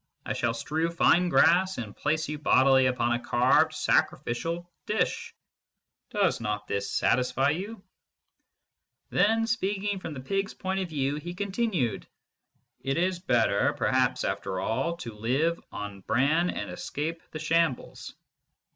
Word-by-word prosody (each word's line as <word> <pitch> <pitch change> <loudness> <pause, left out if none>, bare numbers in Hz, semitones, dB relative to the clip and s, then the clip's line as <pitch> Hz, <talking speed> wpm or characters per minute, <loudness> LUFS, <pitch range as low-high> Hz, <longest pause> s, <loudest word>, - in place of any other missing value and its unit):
I - - -2
shall 115 -1 -1
strew 160 +8 -1
fine 170 +1 +3
grass, 180 +3 +4
and 110 -4 -6
place 155 +1 -1
you 150 0 -4
bodily 130 -2 +4
upon 120 -2 0
a 120 - 0
carved 120 +1 +3
sacrificial 165 +8 0 0.2
dish. 460 - -1 0.7
Does 205 - +1
not 105 -2 -3
this 100 0 -2
satisfy 130 +2 +2
you? 195 +5 -5 1.3
Then, 225 +2 +3
speaking 205 -3 -1
from 160 -4 -6
the - - -6
pigs 195 +9 -2
point 190 +1 -2
of 185 -2 -3
view, 140 -2 -1
he 175 +4 -6
continued: 195 - -1 0.7
It 135 +2 -2
is 180 +1 0
better, 115 - +2
perhaps, - - +1
after 95 -1 -2
all, 115 - -1
to 115 -9 -7
live 135 +10 0
on 105 -1 -6
bran 155 - +2
and - - -4
escape 165 -1 -4
the - - -7
shambles. 160 -3 -1
160 Hz, 140 wpm, -27 LUFS, 125-185 Hz, 1.3 s, grass